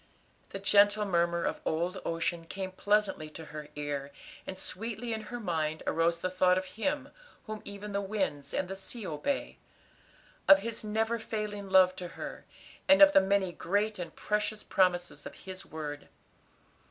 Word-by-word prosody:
The - - -5
gentle 205 +2 +4
murmur 170 -2 +1
of - - -2
old 175 +4 -1
ocean 165 0 -1
came 190 +1 -4
pleasantly 205 -5 +1
to 160 +1 -9
her 150 -1 -6
ear, 145 -1 -3 0.4
and 190 - -5
sweetly 225 +4 -3
in 220 - -3
her 245 -1 -4
mind 160 -6 -1
arose 165 +1 +2
the 185 +2 -2
thought 185 0 +4
of 185 - -1
Him 275 +9 -2 0.4
whom 215 -1 -6
even 205 +1 -7
the 200 0 0
winds 190 -8 -2
and 190 - -1
the 195 - -5
sea 195 +3 -6
obey; 155 - -2 0.9
of 195 - +10
His 225 +3 -3
never 220 +2 0
failing 210 -2 -4
love 185 -1 +6
to 180 - -5
her, - - -7 0.4
and 285 0 +8
of 295 0 +8
the 195 - +8
many 190 -1 +2
great 205 +4 0
and 175 - -6
precious 210 0 -1
promises 180 -2 +1
of - - -10
His 190 0 -7
word. 150 -2 -6
190 Hz, 165 wpm, -31 LUFS, 170-210 Hz, 0.9 s, of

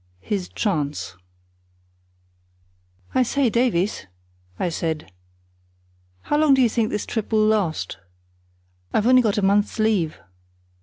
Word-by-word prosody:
His 190 - -3
Chance 150 - -2 2.0
"I 260 - +3
say, 255 0 +1
Davies," 210 - 0 0.5
I 180 - -1
said, 160 - -3 1.1
"how 295 - 0
long 300 -3 +5
do 265 - +3
you 240 - +4
think 220 0 0
this 210 - -3
trip 220 -2 -4
will 215 -1 +3
last? 175 - 0 0.9
I've 210 - +1
only 255 +1 +6
got 215 -4 0
a 205 - 0
month's 200 +2 +2
leave." 210 -8 +1
210 Hz, 120 wpm, -22 LUFS, 170-235 Hz, 2.0 s, only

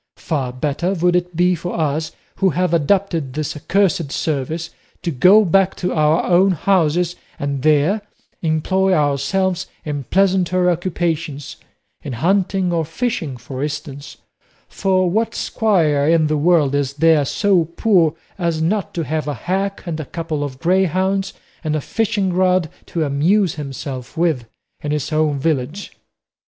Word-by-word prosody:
Far 140 -7 -2
better 150 +8 -1
would 175 0 +2
it 180 -1 -1
be 180 +2 +3
for 175 0 -4
us 155 +1 -1 0.3
who 195 0 +3
have 180 +1 0
adopted 165 -3 +1
this 155 +1 -3
accursed 165 -1 0
service 155 +3 -2 0.3
to 170 - -1
go 185 +10 +6
back 195 +1 +3
to 180 - -2
our 155 0 +2
own 185 +2 +4
houses, 175 -1 +1 0.2
and 140 -1 -3
there 155 +8 +3 0.4
employ 185 +4 +1
ourselves 175 +6 0 0.2
in 145 -3 -4
pleasanter 185 -1 +2
occupations 165 -4 -3 0.4
in 140 - -6
hunting 185 - +1
or 165 -1 +1
fishing, 165 - -3
for 130 +2 -7
instance; 145 -1 -5 0.5
for 185 -1 +1
what 220 +6 0
squire 160 -10 +1
in 165 -1 +4
the 155 0 +1
world 150 -2 +3
is 140 -1 0
there 160 0 +4
so 185 +4 +2
poor 170 -2 +2 0.2
as 170 -3 0
not 190 +5 -1
to 170 - -1
have 155 +1 -2
a 145 - -2
hack 195 - -2
and 165 -3 -4
a 155 - -4
couple 160 -1 -4
of 135 -3 -5
greyhounds 190 +4 +1 0.3
and 155 -1 -1
a - - 0
fishingrod 185 -3 0 0.2
to 165 - -1
amuse 165 +6 +2
himself 135 -1 -7
with 160 -8 +1 0.4
in 150 - -4
his 150 +1 -2
own 155 -2 +1
village?" 150 +5 -2
165 Hz, 145 wpm, -19 LUFS, 150-185 Hz, 0.5 s, go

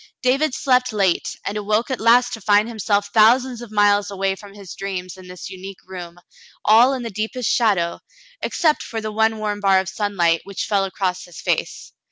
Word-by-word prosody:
David 270 +2 +2
slept 250 -1 +2
late, 195 -5 0
and 200 - -3
awoke 215 +5 0
at 260 - -2
last 240 +2 +4
to 225 - -6
find 205 +2 +3
himself 205 -3 -1
thousands 240 +3 +4
of 235 -3 -10
miles 205 -1 +3
away 195 -1 -1
from 200 0 -14
his 195 -4 -10
dreams 185 -2 -5
in 185 -1 -13
this 180 0 -9
unique 190 0 -10
room, 175 -2 -9 0.5
all 230 +5 +6
in 255 -2 -4
the 230 - -5
deep 215 +5 -4
est 250 -2 -3
shadow, 195 -8 +1 0.4
except 315 -3 +1
for 225 - -5
the 215 0 -5
one 220 +1 +1
warm 210 -1 -3
bar 195 -2 +4
of 190 - -3
sunlight 190 -5 0
which 200 -1 -5
fell 200 -2 +1
across 185 -1 -3
his 170 -2 -12
face. - - -3
205 Hz, 200 wpm, -21 LUFS, 190-230 Hz, 0.5 s, all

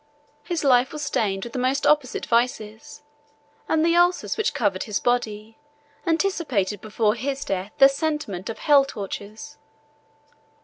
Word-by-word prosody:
His 345 -3 -3
life 255 -1 +3
was 300 -1 -5
stained 195 -8 -1
with 235 - -8
the - - -3
most 260 +2 0
opposite 295 -4 +1
vices, 230 +1 -2 0.7
and 320 0 +2
the 335 0 +3
ulcers 350 +1 +2
which 440 - -1
covered 200 -5 0
his 210 -2 -2
body, 225 -1 -2 0.5
anticipated 315 - 0
before 215 0 0
his 270 +3 -4
death 195 +1 -3
the 270 -1 +8
sentiment 275 - -3
of 225 - -5
hell 285 -2 +5
tortures. 215 +4 -8
245 Hz, 140 wpm, -23 LUFS, 210-295 Hz, 0.7 s, the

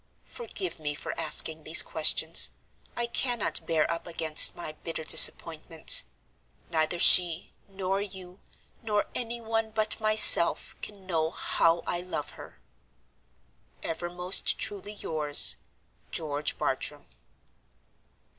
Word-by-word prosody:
Forgive 395 - -8
me 145 -1 -5
for - - -8
asking 160 -1 -2
these 160 +3 +4
questions. 160 +1 +2 0.5
I 240 - -2
cannot 240 -1 -3
bear 160 -2 0
up 170 +1 -7
against 160 -2 +2
my 170 - -8
bitter 160 +1 -9
disappointment. 160 0 +4 0.7
Neither 160 +1 -2
she, 175 -1 +4
nor 195 0 -5
you, 185 -2 -11 0.4
nor 210 -2 -3
any 235 0 -6
one 225 0 -4
but 215 0 -2
myself, 215 -5 +6
can 200 -2 -11
know 160 -3 -3
how 165 0 -2
I 175 - -4
love 180 -5 -7
her. - - -15 1.2
"Ever 175 +1 -6
most 180 +2 0
truly 205 0 -6
yours, 155 -7 -1 0.5
"GEORGE 150 -2 -5
BARTRAM. - - -5
175 Hz, 115 wpm, -26 LUFS, 160-205 Hz, 1.2 s, myself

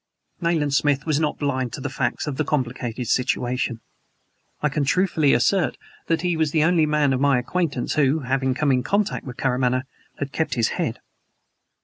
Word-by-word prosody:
Nayland 160 -4 +1
Smith 145 0 +2
was 155 -2 +1
not 155 -2 0
blind 130 -4 -1
to - - -5
the 140 - -3
facts 130 -3 -2
of 145 -3 -4
the 155 - +1
complicated 125 -4 -2
situation. 125 -1 0 0.8
I - - +4
can 145 0 -1
truthfully 155 -1 +2
assert 145 +4 +2 0.3
that 165 -1 +1
he 175 -1 +1
was 160 -1 +1
the 155 0 +2
only 165 -2 +3
man 150 -2 +2
of 130 - -1
my 140 -2 +4
acquaintance 145 0 -1
who, 150 +1 +2
having 130 0 0
come 145 +1 +1
in 130 -1 +2
contact 200 - -1
with 125 - -7
Karamaneh, 130 -1 +1 0.3
had 140 -1 -4
kept 160 - -1
his 115 -3 +2
head. - - -3
140 Hz, 185 wpm, -23 LUFS, 130-155 Hz, 0.8 s, I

